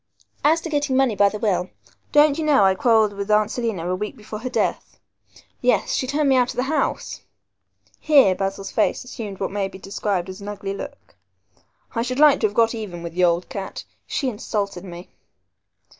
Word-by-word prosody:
As 320 +3 +4
to 330 - -5
getting 290 -3 0
money 265 -5 +3
by 200 0 +4
the 210 - -5
will, 185 -4 0 0.4
don't 295 0 +5
you - - -1
know 295 -8 +4
I 190 - +5
quarrelled 220 0 +3
with 200 +1 -5
Aunt 210 0 +3
Selina 225 -8 -2
a 180 - 0
week 210 +3 -5
before 215 0 -8
her 255 +3 -4
death. - - -2 0.6
Yes, - - +2
she 260 - -1
turned 290 +2 +1
me 270 - +4
out 250 -1 +3
of - - -5
the 250 - 0
house." 305 +4 -2 0.8
Here 275 -11 +5
Basil's 195 +1 -4
face - - +1
assumed 215 -6 -7
what 195 - -2
may 200 -1 -1
be 190 - -11
described 195 -1 -2
as 190 +2 -9
an 200 - -8
ugly 200 -1 -4
look. 280 +8 -9 0.8
"I 230 - -1
should 255 +2 -3
like 295 -1 +6
to 215 - +3
have 205 - -10
got 230 0 +3
even 195 -7 -6
with 170 -1 -6
the 180 +1 +1
old 170 +1 +1
cat. 195 -1 -6 0.2
She 275 - -2
insulted 205 -5 -3
me." 175 -1 -10
210 Hz, 205 wpm, -22 LUFS, 195-260 Hz, 0.8 s, like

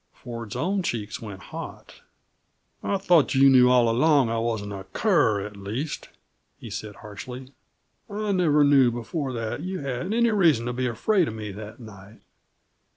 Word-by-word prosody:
Ford's 115 -4 -8
own 190 +4 0
cheeks 110 - -4
went 105 -4 -8
hot. - - -9 0.8
"I 200 - 0
thought 175 -7 +3
you 135 0 +6
knew 125 -1 +6
all 125 -2 +5
along 135 +2 +3
that - - -1
I - - -1
wasn't 110 -3 -2
a 95 -1 -7
cur, 110 - +2
at 105 0 -9
least," 110 +10 -5 0.5
he - - -10
said 105 -2 -6
harshly. 125 +6 -9 0.6
"I 210 0 -2
never 160 -6 +3
knew 140 -3 +5
before 130 +4 -4
that 115 +3 -4
you 185 0 -4
had 140 +7 -3
any 235 +1 +3
reason 165 - +3
to 125 - -2
be 125 +1 -1
afraid 170 - +1
of 110 - -5
me, 105 -2 -6
that 105 +3 -9
night. 105 -1 -13
125 Hz, 170 wpm, -25 LUFS, 110-160 Hz, 0.8 s, you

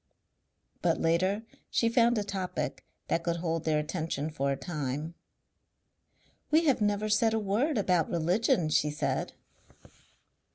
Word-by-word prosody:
But - - +1
later 185 +6 +1 0.3
she 230 - +2
found 235 0 +3
a 210 - +1
topic 190 -2 -4 0.2
that 165 - +1
could 170 0 0
hold 165 -1 -2
their 155 -1 +2
attention 155 -1 -2
for 140 -2 -1
a - - +1
time. 150 0 -4 1.4
"We 315 +2 +4
have 275 -7 +3
never 205 0 +1
said 220 +1 +3
a - - +1
word 225 +8 0
about 180 -5 +2
religion," 175 0 +1
she 150 0 +2
said. 140 -3 -2
180 Hz, 135 wpm, -29 LUFS, 155-215 Hz, 1.4 s, We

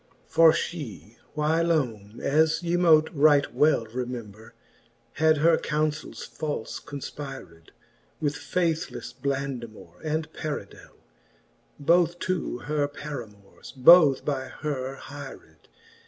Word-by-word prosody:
XLI. - - -34
For 165 -1 +6
fhe 120 - -5 0.2
whylome, 150 -9 0
as 155 +3 +2
they 175 0 -1
mote 160 -3 +4
yet - - -16
right 145 0 +4
well 150 -6 +3
Remember, 115 -2 -7 0.6
had 155 0 +3
her 160 +2 +4
counfels 150 0 -2
falfe 150 -8 -5
confpyred 135 - -8
■ - - -28 0.5
With 145 -2 0
faithlefle 165 0 -3
Blandamour 130 -10 -5
and 155 0 -2
Paridelly 150 -2 -7 0.8
(Both 170 +3 +3
two 185 -8 -2
her 150 -1 0
paramours, 120 -9 -9
both 145 0 +7
by 135 -3 -1
her 135 -3 -4
hyred. 140 0 -11
145 Hz, 110 wpm, -26 LUFS, 125-155 Hz, 0.8 s, both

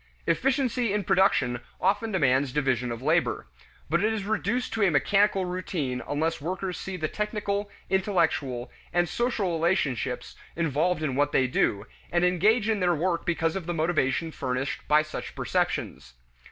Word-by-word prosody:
Efficiency 255 -4 +1
in 205 0 0
production 130 -11 +2 0.2
often 205 +4 +1
demands 140 -6 +2
division 130 -3 0
of 115 +2 -6
labor. - - +1 0.4
But 170 +5 +1
it 215 - +3
is 220 -3 -2
reduced 220 +4 -1
to 225 - -1
a 200 - +5
mechanical 195 +5 +3
routine 170 -8 -3
unless 160 +2 -1
workers 180 +3 -3
see 190 -1 -5
the 155 -2 -1
technical, 210 0 -2 0.2
intellectual, 160 - 0 0.2
and 175 0 +2
social 225 -4 -1
relationships 160 - -1 0.2
involved 160 +1 0
in 145 -4 0
what 145 +1 +1
they 130 - +4
do, 105 -4 0 0.3
and 175 +1 +3
engage 205 +6 +3
in 220 -2 +1
their 175 -2 +2
work 170 +2 -1
because 165 -1 0
of 185 -4 -4
the 175 - -2
motivation 160 -1 0
furnished 130 -1 -3
by 150 +1 +5
such 155 - -7
perceptions. 60 -3 -2
175 Hz, 155 wpm, -27 LUFS, 145-200 Hz, 0.4 s, a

